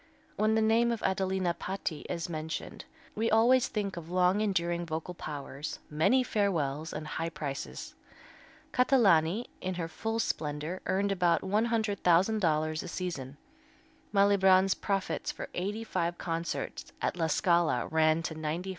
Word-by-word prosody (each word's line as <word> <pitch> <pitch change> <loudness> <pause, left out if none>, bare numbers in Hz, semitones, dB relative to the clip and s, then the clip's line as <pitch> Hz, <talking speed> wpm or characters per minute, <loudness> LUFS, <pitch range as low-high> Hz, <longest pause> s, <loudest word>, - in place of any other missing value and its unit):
When 215 +1 +2
the 220 - +3
name 230 +2 +3
of 230 - -3
Adelina 190 -2 0
Patti 185 -4 -5
is 170 - -3
mentioned, 160 -1 -5 0.3
we 225 +2 0
always 240 +3 +5
think 200 -4 -3
of 170 -1 -7
long 180 +3 +3
enduring 175 -4 0
vocal 165 +1 -4
powers, 145 -2 -6
many 195 +13 +3
farewells 160 - -1
and 155 0 -5
high 165 +2 -3
prices. 145 -4 -6 0.8
Catalani, 215 - +4 0.2
in 185 0 -2
her 170 -2 -3
full 225 +8 -3
splendor, 155 -3 -2
earned 195 +2 +1
about 175 -3 +2
$100,000 190 -6 +1
a - - -7
season. 150 -7 -5 0.7
Malibran's 195 -2 +5
profits 195 -2 -2
for - - -7
eighty 205 +5 -3
five 170 -5 -2
concerts 165 -1 -4
at - - -1
La 165 -2 0
Scala 170 +1 +2
ran 160 +1 +2
to 160 - -3
$95,000. 160 +4 -3
180 Hz, 135 wpm, -30 LUFS, 160-205 Hz, 0.8 s, always